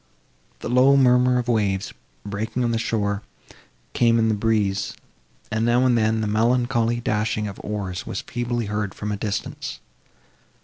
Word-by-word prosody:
The - - -4
low 130 +3 +5
murmur 125 -1 +4
of 120 -1 -2
waves, 100 -4 0 0.3
breaking 110 +5 -2
on 120 - +1
the 115 - 0
shore, 100 -3 -1 0.7
came 115 -1 +3
in 115 -1 +3
the - - +2
breeze, 105 -2 0 0.6
and, 110 +1 0
now 120 +2 +3
and 125 -2 +4
then, 110 -1 +2
the 110 - -1
melancholy 120 +2 +1
dashing 105 -1 -1
of 100 - -8
oars 100 -4 -4
was - - -3
feebly 120 -1 -3
heard 105 -1 -3
from 105 0 -4
a - - -1
distance. 105 +1 -4
110 Hz, 160 wpm, -23 LUFS, 105-120 Hz, 0.7 s, low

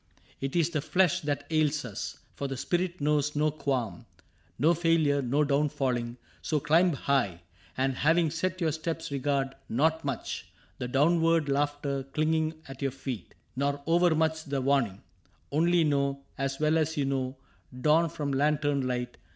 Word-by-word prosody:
It 135 +2 -3
is 170 -1 +2
the 155 -4 -1
flesh 180 +2 +2
That 145 -2 -2
ails 150 -2 +1
us, 105 -5 -5 0.2
for 140 - -4
the 135 -1 -4
spirit 175 +5 -1
knows 150 0 +1
no 150 +1 +2
qualm. 130 - -2 0.5
No 160 +4 +4
failure, 165 -4 +2
no 135 +4 +1
down 145 +1 +2
falling: 120 -3 -2 0.2
so 155 - 0
climb 165 +5 +3
high. 130 -11 0 0.4
And 130 0 0
having 160 +1 +3
set 185 +3 -2
your 160 -2 +2
steps 160 0 -4
regard 140 -1 0 0.2
not 160 +6 +1
much 140 -4 -4 0.3
The 125 - -2
downward 165 +3 +3
laughter 145 0 0
clinging 155 +3 -1
at 135 0 -10
your 135 - +1
feet. 130 -7 -7 0.2
Nor 140 +1 -1
overmuch 160 -2 +2
the 140 -2 -1
warning; 130 -7 +1 0.5
only 170 +3 +3
know. 140 -2 0
As 135 0 -2
well 155 +1 +3
as 160 +1 -1
you 140 - +1
know 135 -1 -2 0.4
dawn 160 +4 +4
from 145 -1 -3
lantern 145 -1 +1
light. 125 -1 -3
145 Hz, 160 wpm, -29 LUFS, 135-160 Hz, 0.5 s, No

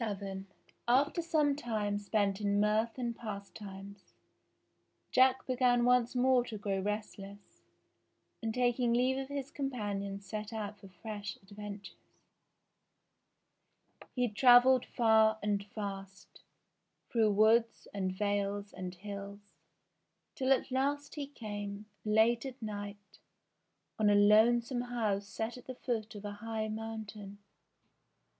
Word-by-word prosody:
VII 195 -2 -4 0.4
After 280 +7 +3
some 305 -4 +2
time 215 -6 -2
spent 205 -1 0
in 205 0 +1
mirth 215 +3 +1
and 240 -2 -2
pastimes, 200 -2 -9 1.0
Jack 260 0 +4
began 250 -2 +3
once 250 0 +3
more 250 0 +4
to 220 -3 -6
grow 200 -1 -2
restless, 205 0 -6 0.8
and 225 -1 -1
taking 245 0 +1
leave 255 +2 +2
of 270 - -4
his 280 -1 -5
companions 200 -7 -3
set 215 +1 -5
out 210 -2 -5
for 195 - -12
fresh 205 +1 -7
adventures. 205 0 -9 2.2
He 250 -1 +2
travelled 245 +3 +6
far 220 -2 +4
and 205 -1 0
fast, 195 -3 -7 0.7
through 220 -4 +3
woods, 225 +3 +3
and 190 -2 -1
vales, 200 +1 -2
and 185 -1 -6
hills, 200 +1 -8 0.8
till 265 0 0
at 265 0 +2
last 285 +2 -1
he 290 -3 -4
came, 205 -5 -6 0.2
late 220 +2 +3
at 265 -1 -7
night, 205 -2 -7 0.8
on 215 -1 +4
a 205 - +5
lonesome 235 +4 +4
house 220 -5 -1
set 225 +3 -4
at 250 - -14
the 255 - -6
foot 225 -4 -3
of 205 0 -8
a 205 - -3
high 220 -1 -3
mountain. 215 -2 -6
215 Hz, 125 wpm, -32 LUFS, 205-245 Hz, 2.2 s, travelled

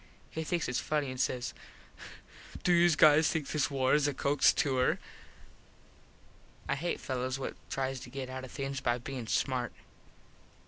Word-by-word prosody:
He 160 - -3
thinks 170 +1 -1
its 125 - 0
funny 150 -3 -1
an 130 - -7
says 125 -1 -1 1.1
"Do 180 - +4
youse 170 -1 +5
guys 155 +1 +6
think 160 -6 -1
this 145 -2 +1
war 130 -2 +1
is 150 -1 +4
a 145 - -2
Cooks 145 +1 +4
tour?" 130 -3 +1 1.7
I - - +1
hate 165 +5 -2
fellos 130 0 -2
what 135 - -4 0.2
tries 135 -1 -2
to 125 - -10
get 135 0 -5
out 130 0 -6
of 130 - -8
things 135 -1 -4
by 120 -2 +1
bein 125 -1 -6
smart. 130 +1 0
135 Hz, 165 wpm, -31 LUFS, 130-150 Hz, 1.7 s, guys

